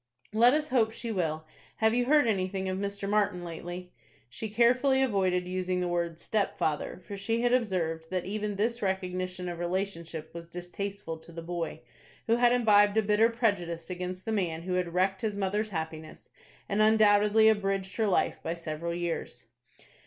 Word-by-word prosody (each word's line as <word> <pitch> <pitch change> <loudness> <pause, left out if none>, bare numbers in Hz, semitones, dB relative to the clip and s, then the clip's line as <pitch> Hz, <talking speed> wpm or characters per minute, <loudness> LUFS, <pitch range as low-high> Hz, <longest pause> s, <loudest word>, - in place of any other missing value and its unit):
"Let 240 +5 +6
us 305 0 -1
hope 235 -5 +3
she 230 +1 -5
will. 160 -5 -1 0.3
Have 220 0 +2
you 245 0 +2
heard 295 +1 +5
anything 190 -3 -1
of 185 0 -2
Mr. 200 0 -3
Martin 200 -4 +1
lately?" 175 +2 -7 0.4
She 220 - -5
carefully 250 +5 +3
avoided 185 -6 +1
using 185 0 -1
the 180 - 0
word 170 -1 -1
"stepfather" 180 -4 -1
for 200 - -6
she 225 +4 -1
had 245 0 +2
observed 170 -9 0
that 185 -1 -2
even 210 +1 -3
this 235 +4 0
recognition 185 -1 -2
of 175 -1 -5
relationship 175 -3 -3
was 170 0 -8
distasteful 175 0 -6
to 160 - -15
the 165 0 -7
boy, 170 -4 -4 0.4
who 230 +1 +3
had 240 0 +5
imbibed 210 -4 +4
a 220 - +4
bitter 210 +2 +4
prejudice 190 -8 -1
against 180 +1 -5
the 225 - -2
man 170 -6 -1
who 185 +1 -3
had 180 -1 0
wrecked 190 +3 +1
his 215 -3 -2
mother's 205 +2 -1
happiness, 160 -3 -6 0.4
and 205 +1 +1
undoubtedly 215 0 +5
abridged 195 -3 +1
her 220 -2 +2
life 195 - +1
by 165 - -3
several 170 0 -4
years. 170 -8 -4
190 Hz, 175 wpm, -29 LUFS, 175-215 Hz, 0.4 s, Let